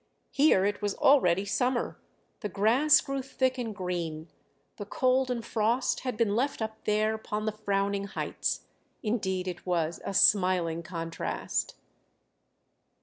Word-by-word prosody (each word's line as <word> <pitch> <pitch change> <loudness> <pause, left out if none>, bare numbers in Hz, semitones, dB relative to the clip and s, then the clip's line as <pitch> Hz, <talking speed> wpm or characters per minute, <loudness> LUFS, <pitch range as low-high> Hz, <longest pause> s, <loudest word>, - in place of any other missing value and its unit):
Here 275 -10 +4
it 205 +1 -1
was 205 -1 -1
already 195 -9 +4
summer, 240 +4 -1 0.4
the 210 - -4
grass 230 +10 +4
grew 275 -1 -3
thick 260 -1 -1
and 225 -4 -4
green; 170 -4 -4 0.5
the 205 - -6
cold 255 +3 +1
and 235 -2 -3
frost 230 +3 0
had 250 -4 -4
been 210 -3 +1
left 270 +5 0
up 220 -1 -5
there 215 +1 +2
upon 215 -1 -4
the 215 - 0
frowning 200 -1 -1
heights; 200 - -3 0.4
indeed 190 -5 -1
it 175 -2 -5
was 170 -2 -1
a 195 - -4
smiling 180 -5 +3
contrast. 165 -1 -3
210 Hz, 140 wpm, -28 LUFS, 185-240 Hz, 0.5 s, Here